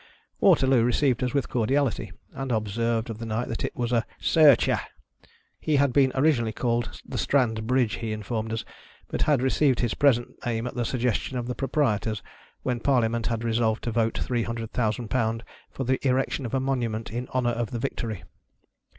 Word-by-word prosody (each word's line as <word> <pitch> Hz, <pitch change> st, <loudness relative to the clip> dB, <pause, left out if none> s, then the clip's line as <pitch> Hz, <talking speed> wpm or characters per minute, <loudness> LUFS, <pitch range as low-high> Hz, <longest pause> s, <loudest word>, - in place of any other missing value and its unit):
Waterloo 130 Hz, -2 st, +5 dB
received 125 Hz, +1 st, +2 dB
xis 125 Hz, 0 st, -1 dB
with 140 Hz, -, +1 dB
cordiality, 130 Hz, +1 st, 0 dB, 0.2 s
and 135 Hz, -1 st, -4 dB
observed 115 Hz, +2 st, 0 dB
of 110 Hz, -, -8 dB
the 115 Hz, -, -5 dB
night 110 Hz, +2 st, -2 dB
that 115 Hz, -, -3 dB
it -, -, -3 dB
was 120 Hz, -1 st, -2 dB
"a 115 Hz, -2 st, +2 dB, 0.2 s
Searcher." 150 Hz, -7 st, +5 dB, 0.8 s
He 155 Hz, -, 0 dB
had 140 Hz, -2 st, +3 dB
been 135 Hz, -1 st, +4 dB
originally 130 Hz, -6 st, +2 dB
called 120 Hz, +1 st, -1 dB
the 125 Hz, -, -4 dB
Strand 110 Hz, +1 st, +1 dB
Bridge, 125 Hz, -3 st, +2 dB
he 115 Hz, -2 st, -4 dB
informed 110 Hz, +1 st, -3 dB
us, 115 Hz, 0 st, -3 dB, 0.4 s
but -, -, -3 dB
had 145 Hz, -4 st, +3 dB
received 130 Hz, -1 st, +2 dB
his 120 Hz, -2 st, 0 dB
present 125 Hz, -5 st, +1 dB
name 115 Hz, -1 st, -1 dB
at 125 Hz, -, -4 dB
the 120 Hz, -1 st, -2 dB
suggestion 125 Hz, +1 st, -1 dB
of 120 Hz, -, -2 dB
the 125 Hz, -, -3 dB
pro 135 Hz, +3 st, -3 dB
prietors, 110 Hz, -7 st, 0 dB, 0.4 s
when 125 Hz, -2 st, -1 dB
Parliament 115 Hz, -3 st, +1 dB
had 115 Hz, -1 st, -2 dB
resolved 115 Hz, -1 st, +1 dB
to 120 Hz, -, -2 dB
vote 115 Hz, 0 st, 0 dB
three 120 Hz, -2 st, -1 dB
hundred 115 Hz, -1 st, -4 dB
thousand 115 Hz, -1 st, -1 dB
pound 115 Hz, -2 st, 0 dB, 0.3 s
for 135 Hz, -, -5 dB
the 130 Hz, +1 st, +1 dB
erection 130 Hz, 0 st, 0 dB
of 125 Hz, -, -3 dB
a -, -, +2 dB
monument 120 Hz, -4 st, -2 dB
in 120 Hz, +2 st, -4 dB
honor 125 Hz, -2 st, +1 dB
of 115 Hz, -2 st, -2 dB
the 120 Hz, -, -4 dB
victory. 115 Hz, -5 st, -4 dB
120 Hz, 190 wpm, -26 LUFS, 115-130 Hz, 0.8 s, Waterloo